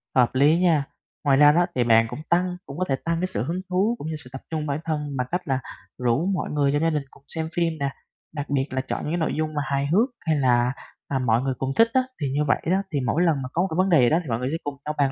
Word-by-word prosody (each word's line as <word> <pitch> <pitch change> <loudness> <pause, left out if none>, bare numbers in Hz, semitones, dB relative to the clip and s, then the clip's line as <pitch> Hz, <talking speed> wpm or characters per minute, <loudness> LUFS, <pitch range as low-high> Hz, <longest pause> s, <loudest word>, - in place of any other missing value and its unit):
Hợp 125 0 +3
lý 145 +5 +5
nha. 165 -5 +3 0.4
Ngoài 135 -2 +4
ra 145 0 +8
đó 175 +3 +3
thì 125 - +2
bạn 115 -1 +5
cũng - - -6
tăng 180 +1 +2
cũng 140 - -9
có 185 - 0
thể 135 - +3
tăng 165 0 0
cái 185 - 0
sự 110 - -2
hứng 175 +6 -3
thú, 195 +6 +2
cũng 155 - -6
như 160 - -3
sự 125 - -13
tập 135 - -7
trung 155 -2 -2
bản 140 +2 -1
thân 150 -3 -2
bằng 125 - -1
cách 180 +1 0
là 135 -1 +1 0.4
rủ 125 +7 +2
mọi 185 - -2
người 145 -2 +2
trong 145 +2 +1
gia 165 - +3
đình 150 -3 -1
cùng 140 - -20
xem 160 +1 -3
phim 170 -1 +1
nè, 140 - 0 0.5
đặc 145 -1 -4
biệt 135 -2 +1
là 130 0 -1
chọn 135 - -4
những 150 - -3
cái 175 - +1
nội 160 - 0
dung 155 0 -1
mà 145 - -1
hài 140 +1 0
hước 215 - +3
hay 160 -2 0
là, 125 -1 +3 0.3
à, 135 - -1
mọi 120 -1 +2
người 135 0 -1
cùng 135 +1 -2
thích 230 - +6
á. 260 - +4 0.2
Thì 145 - 0
như 150 +1 +1
vậy - - +2
đó, 190 +1 +3
thì 140 - +1
mỗi 145 +9 +1
lần 155 -6 +2
mà 130 - -5
có 170 - +1
một 190 - +1
cái - - -2
vấn 185 +1 +3
đề 165 -6 +5
gì 120 - +5
đó 160 - +3
thì 140 - -9
mọi 115 - 0
người 125 +2 -2
sẽ 160 - -1
cùng 145 -1 -4
nhau 150 - -3
bàn 140 -2 +2
145 Hz, 315 wpm, -24 LUFS, 135-165 Hz, 0.5 s, ra